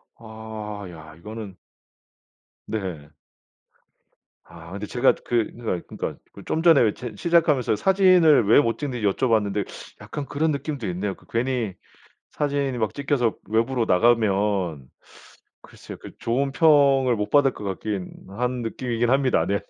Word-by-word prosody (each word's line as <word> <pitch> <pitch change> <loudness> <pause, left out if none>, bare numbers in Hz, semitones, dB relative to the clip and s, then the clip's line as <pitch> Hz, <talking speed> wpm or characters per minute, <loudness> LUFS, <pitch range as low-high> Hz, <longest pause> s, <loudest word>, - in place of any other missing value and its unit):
아. 110 -2 -8
야 80 -2 -12
이거는 105 0 -9 1.1
네. 90 -9 -5 1.4
아 85 +1 -13
근데 100 +2 -5
제가 125 +2 +3
그 120 -3 0
그러니까 110 -7 -5
그러니까 - - -4 0.2
그 - - -12
좀 160 - -1
전에 165 -6 +6
왜 115 - +4
이제 120 +2 -7
시작하면서 160 -8 +2
사진을 180 - +5
왜 115 - +7
못찍는지 120 -2 -2
여쭤봤는데 105 -2 +1 0.4
약간 145 - -6
그런 155 +3 0
느낌도 140 -5 -4
있네요. 95 +2 -3
그 - - -23
괜히 115 -4 -1 0.6
사진이 140 -3 -1
막 110 -2 -1
찍혀서 140 -5 0
외부로 115 +2 +1
나가면 100 - +1 0.7
글쎄요. - - -12
그 - - -10
좋은 135 +4 0
평을 140 -4 +4
못 105 -1 -3
받을 145 -2 +4
것 - - -10
같긴 100 -1 -4 0.2
한 125 +4 -2
느낌이긴 120 +1 -2
합니다. 135 -1 +2
네. 100 +1 0
115 Hz, 285 characters per minute, -24 LUFS, 100-135 Hz, 1.4 s, 왜